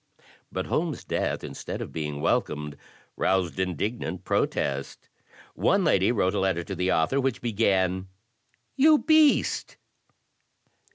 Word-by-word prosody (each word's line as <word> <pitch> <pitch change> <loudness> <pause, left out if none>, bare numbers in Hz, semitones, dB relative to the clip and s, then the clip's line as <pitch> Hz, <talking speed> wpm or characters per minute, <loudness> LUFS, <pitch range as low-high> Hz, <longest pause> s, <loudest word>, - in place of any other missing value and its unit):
But - - -3
Holmes's - - -2
death, - - -2
instead - - -6
of - - -6
being 75 -2 -4
welcomed, 75 -1 -1 0.4
roused 95 -1 0
indignant 95 0 -3
protest. 70 -5 -2 0.4
One 195 0 +2
lady 100 - +3
wrote 100 -5 +1
a 105 - 0
letter 95 -3 0
to 95 - -6
the 90 +1 0
author 110 +13 +2
which 130 -2 -1
began 95 -5 0 0.7
"You 300 +3 +6
beast." 310 -1 +3
95 Hz, 120 wpm, -26 LUFS, 85-120 Hz, 0.7 s, You